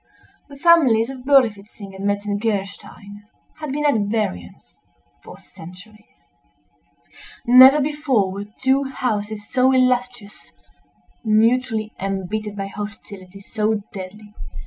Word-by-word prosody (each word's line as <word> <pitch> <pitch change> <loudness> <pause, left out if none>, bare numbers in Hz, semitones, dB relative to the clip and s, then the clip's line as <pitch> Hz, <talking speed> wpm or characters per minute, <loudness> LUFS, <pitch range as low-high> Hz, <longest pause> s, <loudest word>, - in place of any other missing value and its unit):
_" - - -38
The 280 - -12
families 270 -8 +4
of 260 -1 -11
Berlifitzing 220 -7 +1
and 195 +1 -5
Metzengerstein 205 0 -4 0.4
had 305 -3 -5
been 295 +2 -2
at 290 - +4 0.2
variance 90 - -5 0.4
for - - -12
centuries. 180 - -16 1.2
Never 260 +4 +8
before 280 -9 0
were 200 +1 -6
two 270 +1 +1
houses 215 -5 -4
so 260 0 +2
illustrious, 250 -4 -1 0.7
mutually 220 0 +1
embittered 195 +2 -4
by 195 -1 -4
hostility 200 -1 -9
so 215 +1 -2
deadly. 205 +2 -10
215 Hz, 105 wpm, -20 LUFS, 200-255 Hz, 1.2 s, Never